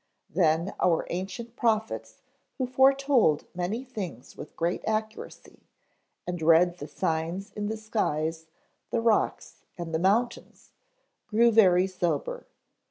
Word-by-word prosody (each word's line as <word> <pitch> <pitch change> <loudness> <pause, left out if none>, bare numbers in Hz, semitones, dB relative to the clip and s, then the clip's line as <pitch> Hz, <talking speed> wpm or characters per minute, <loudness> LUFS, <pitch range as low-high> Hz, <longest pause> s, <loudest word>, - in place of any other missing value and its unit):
Then 165 +2 +2
our 170 -3 +2
ancient 195 +6 -5
prophets 225 -3 -1 0.3
who 260 - 0
foretold 265 - +3
many 185 +8 -3
things 195 - -7
with - - -10
great 170 +2 -1
accuracy, 220 0 -4 0.6
and 175 -2 -4
read 170 +2 +4
the 145 - -6
signs 165 +6 -2
in 205 0 -4
the 220 +1 -3
skies, 160 -7 -2 0.4
the - - 0
rocks, 225 -1 0
and 170 -2 -6
the 160 - +1
mountains, 225 +7 -1 0.6
grew 230 +2 +4
very 185 -5 +5
sober. 190 - -2
195 Hz, 120 wpm, -27 LUFS, 170-230 Hz, 0.6 s, very